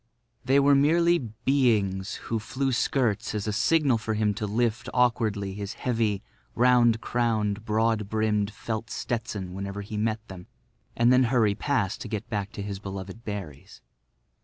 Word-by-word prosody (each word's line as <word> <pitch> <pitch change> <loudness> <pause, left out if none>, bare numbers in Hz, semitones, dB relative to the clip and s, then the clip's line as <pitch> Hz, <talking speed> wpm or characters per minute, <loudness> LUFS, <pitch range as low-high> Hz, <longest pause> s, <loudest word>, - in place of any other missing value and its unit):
They 135 +2 +4
were 140 0 +5
merely 170 +5 +4
beings 110 -5 0
who 115 - -1
flew 130 +5 -2
skirts 120 -4 0
as 105 - -2
a 105 - -1
signal 135 +1 +3
for 110 0 -2
him 105 -1 +1
to 105 +1 -3
lift 120 +3 -1
awkwardly 110 -5 +1
his 100 +1 -5
heavy, 110 -5 -1 0.3
round 120 -2 +4
crowned, 110 -4 0
broad 110 -1 +1
brimmed 105 -2 +1
felt 110 +1 -5
Stetson 110 -6 -4
whenever 100 +1 -5
he 105 +1 -6
met 110 +1 -1
them, 90 -2 -10 0.5
and 120 +2 +5
then 130 0 +5
hurry 115 -4 +3
past 115 -3 -1
to - - -5
get 110 +1 -4
back 105 -1 -2
to 100 - -5
his 100 -1 -5
beloved 95 +2 -7
berries. 95 -10 -7
110 Hz, 160 wpm, -26 LUFS, 100-120 Hz, 0.5 s, were